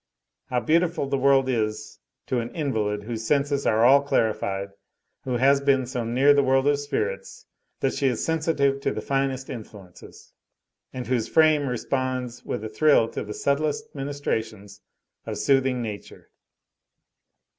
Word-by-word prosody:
How 125 Hz, -, 0 dB
beautiful 165 Hz, +5 st, +1 dB
the 140 Hz, 0 st, 0 dB
world 135 Hz, 0 st, +4 dB
is 110 Hz, -3 st, -2 dB, 0.3 s
to 125 Hz, -, -1 dB
an 115 Hz, 0 st, -4 dB
invalid, 110 Hz, -9 st, -1 dB
whose 115 Hz, 0 st, -5 dB
senses 140 Hz, -1 st, +1 dB
are 110 Hz, +1 st, +3 dB
all 140 Hz, +3 st, +7 dB
clarified, 100 Hz, -7 st, -1 dB, 0.6 s
who 125 Hz, -2 st, -1 dB
has 140 Hz, +3 st, +4 dB
been 135 Hz, -2 st, +2 dB
so 125 Hz, -1 st, -4 dB
near 130 Hz, +5 st, +4 dB
the 140 Hz, -, +4 dB
world 135 Hz, 0 st, +2 dB
of 145 Hz, -1 st, +2 dB
spirits 475 Hz, -, -4 dB, 0.4 s
that -, -, +1 dB
she 140 Hz, -, 0 dB
is 125 Hz, -3 st, -1 dB
sensitive 155 Hz, -4 st, +1 dB
to -, -, 0 dB
the -, -, -4 dB
finest 135 Hz, -1 st, -1 dB
influences, 105 Hz, -7 st, -11 dB, 0.6 s
and 125 Hz, -1 st, -6 dB
whose 125 Hz, -3 st, -1 dB
frame 155 Hz, -3 st, +3 dB
responds 130 Hz, -1 st, -3 dB
with -, -, -4 dB
a -, -, -3 dB
thrill 115 Hz, 0 st, +3 dB
to -, -, -5 dB
the 105 Hz, -, -8 dB
subtlest 155 Hz, +10 st, -1 dB
ministrations 110 Hz, -8 st, -4 dB, 0.5 s
of -, -, -4 dB
soothing 135 Hz, -2 st, +1 dB
nature. 105 Hz, -3 st, -9 dB
130 Hz, 150 wpm, -24 LUFS, 115-140 Hz, 0.6 s, all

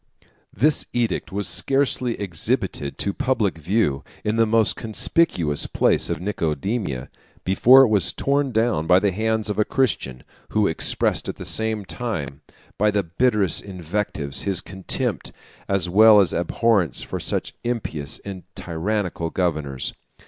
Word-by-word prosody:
] -, -, -37 dB, 0.2 s
This 145 Hz, +8 st, +2 dB
edict 120 Hz, -2 st, -1 dB
was 100 Hz, 0 st, -2 dB
scarcely 130 Hz, +4 st, 0 dB
exhibited 80 Hz, -6 st, -2 dB
to -, -, -1 dB
the -, -, -2 dB
public 110 Hz, -10 st, 0 dB
view, 80 Hz, -4 st, 0 dB, 0.2 s
in 105 Hz, +1 st, 0 dB
the 115 Hz, 0 st, +3 dB
most 110 Hz, 0 st, +3 dB
conspicuous 110 Hz, -, 0 dB
place -, -, +1 dB
of -, -, -2 dB
Nicomedia, 85 Hz, -, -2 dB, 0.3 s
before 125 Hz, +8 st, +6 dB
it -, -, +4 dB
was 105 Hz, -3 st, +2 dB
torn 140 Hz, -1 st, 0 dB
down 110 Hz, -8 st, +1 dB
by 90 Hz, +1 st, +6 dB
the 100 Hz, 0 st, +1 dB
hands 110 Hz, +2 st, -1 dB
of 105 Hz, 0 st, -2 dB
a -, -, +5 dB
Christian, 105 Hz, -, -1 dB, 0.3 s
who 105 Hz, -1 st, +2 dB
expressed 80 Hz, -, 0 dB
at -, -, -4 dB
the -, -, -9 dB
same 110 Hz, -2 st, 0 dB
time, 80 Hz, -, -5 dB, 0.4 s
by 105 Hz, +1 st, +4 dB
the 105 Hz, -1 st, +1 dB
bitterest 95 Hz, 0 st, +1 dB
invectives, 90 Hz, -6 st, -3 dB
his 95 Hz, -3 st, +1 dB
contempt 95 Hz, -1 st, -3 dB, 0.4 s
as 100 Hz, -3 st, +1 dB
well 105 Hz, +3 st, +7 dB
as 95 Hz, -5 st, +3 dB
abhorrence 90 Hz, -, +1 dB
for -, -, -5 dB
such -, -, -3 dB
impious 90 Hz, -12 st, -3 dB
and 95 Hz, -2 st, -6 dB
tyrannical 85 Hz, 0 st, -2 dB
governors. 75 Hz, -8 st, -2 dB
100 Hz, 150 wpm, -22 LUFS, 85-110 Hz, 0.4 s, well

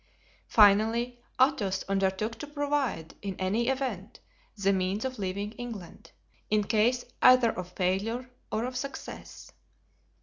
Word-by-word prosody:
Finally, 225 Hz, +4 st, +4 dB, 0.2 s
Athos 205 Hz, -8 st, +2 dB
undertook 195 Hz, +3 st, 0 dB
to 295 Hz, -, -6 dB
provide, 285 Hz, -, -1 dB
in 195 Hz, -2 st, -4 dB
any 205 Hz, +6 st, 0 dB
event, 255 Hz, -7 st, -2 dB, 0.4 s
the 195 Hz, 0 st, +2 dB
means 190 Hz, +4 st, -1 dB
of 260 Hz, -3 st, -4 dB
leaving 200 Hz, +2 st, -3 dB
England—in 215 Hz, -1 st, -5 dB
case 230 Hz, +4 st, +2 dB, 0.2 s
either 255 Hz, -2 st, +7 dB
of 180 Hz, -3 st, -7 dB
failure 200 Hz, +8 st, -1 dB, 0.2 s
or 220 Hz, +2 st, 0 dB
of 255 Hz, 0 st, -5 dB
success. 275 Hz, +2 st, -7 dB
215 Hz, 115 wpm, -29 LUFS, 195-250 Hz, 0.4 s, either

